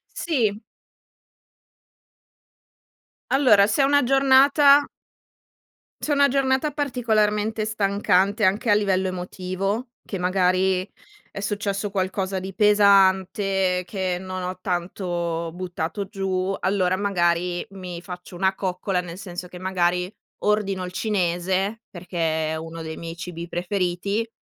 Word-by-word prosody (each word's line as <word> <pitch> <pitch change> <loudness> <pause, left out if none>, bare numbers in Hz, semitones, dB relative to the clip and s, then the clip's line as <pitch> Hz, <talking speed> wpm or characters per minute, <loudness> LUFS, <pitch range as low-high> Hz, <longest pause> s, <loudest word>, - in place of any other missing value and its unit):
Sì. 225 -11 0 2.7
Allora, 250 -8 +5
se 215 +7 +1
è - - +5
una 285 +1 +4
giornata 275 +2 +5 1.2
se 300 - -2
è - - +3
una 280 0 +5
giornata 275 +2 +1
particolarmente 220 -6 0
stancante, 200 -1 +1
anche 205 +5 +2
a - - +6
livello 195 -2 +1
emotivo, 185 +5 -3
che 195 - -4
magari 185 +1 +1 0.4
è - - -7
successo 200 0 -2
qualcosa 190 0 -1
di 190 +1 -7
pesante, 195 -2 +3
che 185 -2 -2
non 185 0 -5
ho 180 0 -5
tanto 175 -2 -3
buttato 180 +2 -4
giù, 195 -2 -2
allora 185 -1 +1
magari 175 -3 0
mi 180 -3 -7
faccio 180 0 -9
una 190 +2 +1
coccola, 185 0 -2
nel 175 -1 -6
senso 180 -2 -7
che 180 - -11
magari 180 0 0 0.3
ordino 200 -3 0
il 180 - -6
cinese, 190 +2 -1
perché 165 -3 -2
è - - -2
uno 165 +1 -7
dei 160 0 -6
miei 165 0 -7
cibi 170 0 -7
preferiti, 185 +4 -2
190 Hz, 120 wpm, -23 LUFS, 180-210 Hz, 2.7 s, a